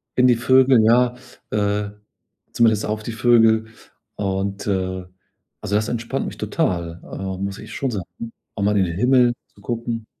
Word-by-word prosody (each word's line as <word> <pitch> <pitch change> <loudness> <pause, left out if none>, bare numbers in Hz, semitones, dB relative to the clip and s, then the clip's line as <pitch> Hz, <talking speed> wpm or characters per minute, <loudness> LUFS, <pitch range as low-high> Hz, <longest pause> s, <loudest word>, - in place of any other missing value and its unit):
in 125 0 +5
die 125 - +5
Vögel, 130 0 +5
ja 120 +2 +4 0.4
äh, 105 0 0 0.6
zumindest 110 -3 +3
auf 105 0 -3
die 115 - -4
Vögel 115 -1 +4 0.5
und, 100 0 -2
äh, 95 -1 -1 0.6
also, 105 - -2
das 105 +1 +1
entspannt 120 0 -3
mich - - -7
total, 85 -1 -2
äh, 95 -1 -5
muss 100 0 -3
ich - - -10
schon 135 -2 -2
sagen 100 -6 -4 0.5
auch 100 - -2
mal 105 +1 +2
in 95 - +4
den 85 -1 -4
Himmel 125 +2 +4 0.2
zu 100 - -19
gucken. 115 0 -4
110 Hz, 165 wpm, -21 LUFS, 100-120 Hz, 0.6 s, in